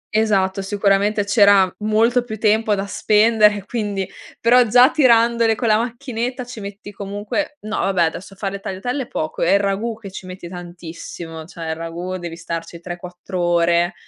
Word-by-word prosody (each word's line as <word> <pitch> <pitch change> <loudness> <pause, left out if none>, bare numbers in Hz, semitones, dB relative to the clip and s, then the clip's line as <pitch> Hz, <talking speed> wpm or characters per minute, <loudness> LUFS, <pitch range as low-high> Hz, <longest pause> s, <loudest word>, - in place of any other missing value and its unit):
Esatto. 195 -3 +2
Sicuramente 200 +1 +1
c'era 200 -3 +5
molto 225 +3 +2
più 220 -3 -6
tempo 215 0 +2
da 195 0 -3
spendere, 210 -1 +3
quindi 205 -4 -3 0.3
però 245 +2 +5
già 245 +5 +6
tirandole 235 -4 +4
con 235 - -2
la 215 - +4
macchinetta 245 +1 -3
ci 245 -2 -9
metti 200 0 -8
comunque 205 +10 -4
no 215 +1 -4
vabbè, 190 -3 +2
adesso 180 +4 -4
a - - -30
fare 195 -1 -3
le 200 - -5
tagliatelle 210 +7 -3
è - - -13
poco, 155 0 -4
è 175 - +3
il 200 - +5
ragù 205 +3 -1
che 200 -4 -10
ci 185 - -9
metti 185 -1 -8
tantissimo. 170 -2 -8
Cioè 165 -1 -7
il - - -2
ragù 170 +3 -5
devi 170 -1 -6
starci 165 0 -6
3,4 180 +1 -6
ore 175 0 +2
200 Hz, 175 wpm, -20 LUFS, 180-225 Hz, 0.3 s, già